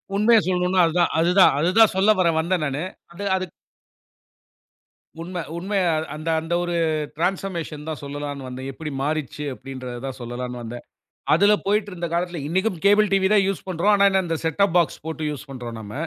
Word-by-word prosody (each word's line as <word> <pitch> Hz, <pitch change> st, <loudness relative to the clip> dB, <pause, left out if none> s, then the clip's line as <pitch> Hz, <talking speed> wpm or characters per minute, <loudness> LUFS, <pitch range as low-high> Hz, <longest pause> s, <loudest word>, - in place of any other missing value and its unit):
உண்மைய 220 Hz, +3 st, +5 dB
சொல்லணும்னா 180 Hz, 0 st, +2 dB
அது 165 Hz, -, -1 dB
தான். -, -, +3 dB
அது 165 Hz, +2 st, +3 dB
தான் 185 Hz, -, +7 dB
அது 165 Hz, +4 st, +2 dB
தான் 225 Hz, -3 st, +7 dB
சொல்ல 190 Hz, +3 st, +3 dB
வர 180 Hz, -, +4 dB
வந்தேன் 170 Hz, 0 st, 0 dB
நான்னு. 140 Hz, +2 st, -2 dB, 0.3 s
அது 190 Hz, +4 st, -7 dB
அது 185 Hz, 0 st, -1 dB, 1.8 s
உண்மை, 175 Hz, +1 st, -5 dB, 0.2 s
உண்மையா 185 Hz, -1 st, 0 dB, 0.2 s
அந்த 155 Hz, +2 st, -4 dB
அந்த 165 Hz, +2 st, -4 dB
ஒரு 175 Hz, 0 st, -2 dB, 0.4 s
ட்ரன்ஸ்பர்மேஷன் 170 Hz, -4 st, -3 dB
தான் 155 Hz, -, -5 dB
சொல்லலாம்னு 145 Hz, -1 st, -5 dB
வந்தேன். 130 Hz, +1 st, -6 dB
எப்படி 150 Hz, +2 st, -6 dB
மாறிச்சு 150 Hz, -1 st, -3 dB
அப்படின்றது 130 Hz, -2 st, -8 dB
தான் 135 Hz, -1 st, -5 dB
சொல்லலாம்னு 120 Hz, +1 st, -5 dB
வந்தேன். 120 Hz, +1 st, -8 dB, 0.5 s
அதுல 200 Hz, +6 st, +5 dB
போயிட்டு 205 Hz, +1 st, +1 dB
இருந்த 175 Hz, -1 st, -4 dB
காலத்துல 175 Hz, 0 st, -1 dB
இன்னிக்கும் 190 Hz, +2 st, 0 dB
கேபிள் 205 Hz, 0 st, +5 dB
டிவி 190 Hz, -1 st, +3 dB
தான் 200 Hz, -2 st, +4 dB
யூஸ் 195 Hz, -2 st, -3 dB
பண்றோம். 185 Hz, +3 st, +2 dB
ஆனா 200 Hz, 0 st, +4 dB
என்ன 190 Hz, 0 st, +2 dB
இந்த 165 Hz, -1 st, -1 dB
செட்டப் 175 Hz, +3 st, +1 dB
பாக்ஸ் 170 Hz, -2 st, 0 dB
போட்டு 160 Hz, -1 st, -4 dB
யூஸ் 150 Hz, +1 st, -8 dB
பண்றோம் 120 Hz, -4 st, -7 dB
நம்ம. 105 Hz, -1 st, -9 dB
170 Hz, 180 wpm, -23 LUFS, 145-190 Hz, 1.8 s, தான்